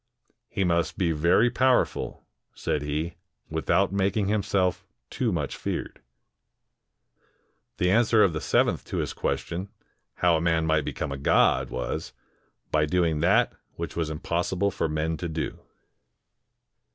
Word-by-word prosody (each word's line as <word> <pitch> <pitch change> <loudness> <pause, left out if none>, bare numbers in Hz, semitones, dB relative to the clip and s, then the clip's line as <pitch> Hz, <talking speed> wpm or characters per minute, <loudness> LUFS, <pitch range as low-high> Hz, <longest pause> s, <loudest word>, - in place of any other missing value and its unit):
" - - -43
He 95 - -1
must 85 -2 +1
be 85 -3 +1
very 85 +10 +3
powerful," 130 0 +1 0.3
said 75 - -1
he, 75 +4 -3 0.3
"without 100 0 +1
making 100 +1 +1
himself 100 -3 +1 0.3
too 120 -4 0
much 75 -6 -2
feared." - - -4 1.8
The 90 0 +2
answer 115 0 +5
of 90 - +3
the 75 - -3
seventh - - +2
to - - -4
his - - -2
question, 90 +4 -3 0.5
how 85 -2 +3
a - - -2
man 80 -1 +2
might 80 -2 +2
become - - -3
a' 70 - -3
god, 70 - +3
was, 60 0 -4 0.6
"By 75 0 +2
doing 85 -2 +1
that 100 +9 +3 0.2
which - - -5
was 80 -2 -1
impossible 90 +5 -1
for 80 - -1
men 80 +1 -1
to 85 +2 -4
do." 80 0 -4
85 Hz, 140 wpm, -26 LUFS, 80-100 Hz, 1.8 s, answer